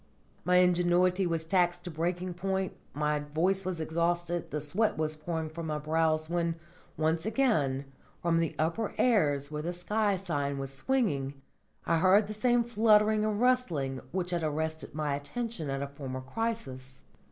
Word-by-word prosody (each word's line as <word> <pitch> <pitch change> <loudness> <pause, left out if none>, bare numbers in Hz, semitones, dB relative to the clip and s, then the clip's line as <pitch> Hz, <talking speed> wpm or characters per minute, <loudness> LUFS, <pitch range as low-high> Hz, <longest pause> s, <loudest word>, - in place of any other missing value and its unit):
My 180 +2 +2
ingenuity 180 +1 +4
was 165 -1 -1
taxed 175 0 +1
to 180 - -5
breaking 175 +3 -2
point, 190 +1 -2 0.2
my 150 0 +1
voice 165 +7 0
was 185 -2 -3
exhausted, 170 +1 -1
the 150 - -2
sweat 180 +10 0
was 155 0 -1
pouring 160 +1 -3
from 160 +1 -6
my 155 -1 -1
brows, 155 +1 +1
when, 170 0 0 0.4
once 160 +1 +1
again, 205 - +1 0.3
from 165 -1 +2
the 165 -2 -1
upper 165 +8 -1
airs 150 - +2
where 150 0 -3
the 175 +3 -3
sky 205 +3 +1
sign 145 -7 -2
was 135 0 -3
swinging, 140 - 0 0.5
I 165 - +2
heard 190 +4 +5
the 215 - -6
same 240 +3 +2
fluttering 215 -2 +4
and 215 -1 0
rustling 175 - +1
which 180 0 -2
had 175 -1 0
arrested 160 0 -3
my 150 -2 -1
attention 160 +4 -4
at 135 0 -2
a - - -3
former 135 -2 -6
crisis. 130 - -4
170 Hz, 165 wpm, -30 LUFS, 150-195 Hz, 0.5 s, heard